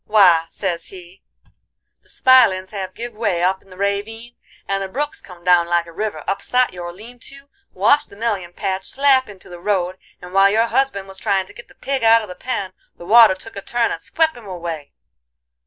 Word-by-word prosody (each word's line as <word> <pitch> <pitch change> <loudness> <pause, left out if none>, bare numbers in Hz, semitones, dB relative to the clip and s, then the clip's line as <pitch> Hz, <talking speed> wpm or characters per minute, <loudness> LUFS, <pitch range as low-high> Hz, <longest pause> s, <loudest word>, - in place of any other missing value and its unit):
"'Why,' 180 -6 +5
sez 180 -4 -4
he, 180 0 -13 0.8
'the - - -26
spilins 225 -8 +4
have 195 -3 -6
give 240 0 -6
way 205 -6 -1
up 190 +1 +1
in - - -23
the 185 - -13
rayvine, 215 +4 -3 0.3
and 195 0 -1
the 195 - -3
brook 290 +8 -3
's - - -4
come 180 -2 -14
down 175 -1 +4
like 170 0 +1
a 170 - -12
river, 185 -4 -4
upsot 250 +4 +1
your 175 -1 -6
lean 225 +7 -13
to, 275 +3 -11 0.2
washed 290 +1 +2
the - - -14
mellion 200 -5 -2
patch 190 +1 -3
slap 265 -3 +3
into 195 -2 -12
the 175 -1 -10
road, 185 -1 -1 0.2
and 180 0 -11
while 195 0 +6
your 220 +3 +3
husband 235 -6 -1
was 190 0 -10
tryin' 195 -1 0
to - - -15
git - - -13
the - - -20
pig 270 -2 -3
out 225 0 +5
of 210 - -9
the - - -6
pen, 190 -2 -4 0.2
the 170 - -11
water 220 -1 +7
took 225 +4 -11
a 200 - -5
turn 235 +3 0
and - - -5
swep 320 -1 0
him 235 -4 -12
away. 170 -5 -6
200 Hz, 215 wpm, -20 LUFS, 180-230 Hz, 0.8 s, water